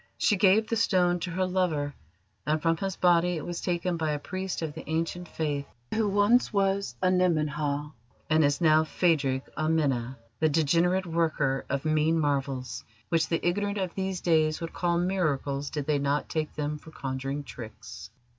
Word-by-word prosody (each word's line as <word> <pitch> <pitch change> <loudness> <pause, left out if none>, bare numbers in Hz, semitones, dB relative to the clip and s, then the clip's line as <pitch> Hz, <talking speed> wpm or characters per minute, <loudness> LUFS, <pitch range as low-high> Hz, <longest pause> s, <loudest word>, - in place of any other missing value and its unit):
She 210 - +3
gave 200 +2 +4
the 230 - -1
stone 180 -5 +2
to 175 - -4
her 185 +2 0
lover, 170 -6 0 0.5
and 155 +1 +2
from 165 +1 +2
his 195 +1 -3
body 175 0 +3
it 155 - -5
was 175 -1 -4
taken 175 0 -1
by 160 -2 0
a - - -1
priest 185 +3 -4
of 155 -2 -3
the 160 - -8
Ancient 165 +2 -2
Faith 145 -4 -3 0.3
who 220 -2 +1
once 205 +5 +3
was 200 -1 0
Anemen 180 -4 +3
Ha, 145 0 -2 0.4
and 155 0 +3
is 145 -1 +2
now 155 -2 +5
Phadrig 150 -5 +1
Amena, 140 -6 0 0.2
the 155 - +3
degenerate 170 +5 +2
worker 160 -5 0
of 140 +2 -2
mean 155 +1 +2
marvels 135 -3 -2 0.3
which 165 -2 +2
the 165 +1 0
ignorant 200 +3 0
of 185 -3 -2
these 190 -2 -3
days 155 -2 +2
would 165 -1 -6
call 175 -1 0
miracles 150 -6 -1
did 150 -3 -4
they 150 -1 +1
not 140 +1 0
take 155 -1 -2
them 150 0 -3
for 160 - -14
conjuring 135 0 -4
tricks. 110 -5 -10
160 Hz, 175 wpm, -28 LUFS, 145-180 Hz, 0.5 s, now